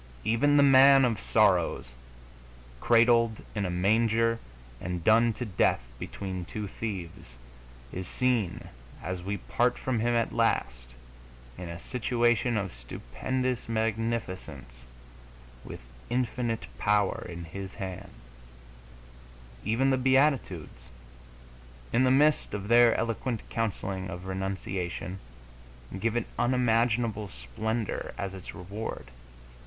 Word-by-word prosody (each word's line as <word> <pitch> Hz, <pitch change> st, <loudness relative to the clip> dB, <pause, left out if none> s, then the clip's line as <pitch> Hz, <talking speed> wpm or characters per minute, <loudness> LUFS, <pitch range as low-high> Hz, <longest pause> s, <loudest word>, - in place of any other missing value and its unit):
Even 120 Hz, +7 st, +3 dB
the 145 Hz, -, +7 dB
Man 135 Hz, 0 st, +7 dB
of 115 Hz, -5 st, -1 dB
Sorrows, -, -, +2 dB, 0.9 s
cradled 115 Hz, -, +4 dB
in 100 Hz, -3 st, -1 dB
a -, -, -3 dB
manger 115 Hz, +5 st, +2 dB, 0.4 s
and 90 Hz, -2 st, -4 dB
done 115 Hz, +3 st, +5 dB
to 125 Hz, -, -5 dB
death 95 Hz, -, +2 dB, 0.2 s
between 95 Hz, -2 st, -5 dB
two 105 Hz, +4 st, -5 dB
thieves, 90 Hz, -, -6 dB, 0.6 s
is 95 Hz, -1 st, -5 dB
seen, 125 Hz, -8 st, -1 dB, 0.3 s
as 90 Hz, 0 st, -4 dB
we 100 Hz, +3 st, -3 dB
part 120 Hz, +6 st, 0 dB
from 130 Hz, -3 st, -1 dB
Him 120 Hz, +2 st, +1 dB
at 115 Hz, -1 st, 0 dB
last, 60 Hz, -1 st, 0 dB, 0.6 s
in 90 Hz, +4 st, -7 dB
a 85 Hz, -, -6 dB
situation 120 Hz, 0 st, +1 dB
of 100 Hz, -3 st, -3 dB
stupendous 125 Hz, -, -3 dB
magnificence, 110 Hz, -, -2 dB, 0.9 s
with -, -, -9 dB, 0.3 s
infinite 120 Hz, -2 st, -1 dB
power 105 Hz, -2 st, +1 dB
in 85 Hz, -1 st, -7 dB
His 95 Hz, +4 st, -7 dB
hands. 95 Hz, 0 st, -7 dB, 1.5 s
Even 125 Hz, +6 st, +2 dB
the 130 Hz, -, +3 dB
Beatitudes, 130 Hz, -, +1 dB, 1.0 s
in 130 Hz, +2 st, +4 dB
the -, -, +4 dB
midst 145 Hz, -3 st, +3 dB
of 100 Hz, 0 st, -5 dB
their 120 Hz, 0 st, +6 dB
eloquent 115 Hz, 0 st, -2 dB
counselling 95 Hz, -4 st, -2 dB
of 90 Hz, +1 st, -7 dB
renunciation, 95 Hz, -1 st, -4 dB, 0.8 s
give 115 Hz, +2 st, 0 dB
it 120 Hz, -, 0 dB
unimaginable 115 Hz, -3 st, +1 dB
splendor 105 Hz, -, -4 dB
as 95 Hz, -1 st, -4 dB
its 95 Hz, -1 st, -9 dB
reward. 100 Hz, -, -6 dB
110 Hz, 115 wpm, -28 LUFS, 95-120 Hz, 1.5 s, the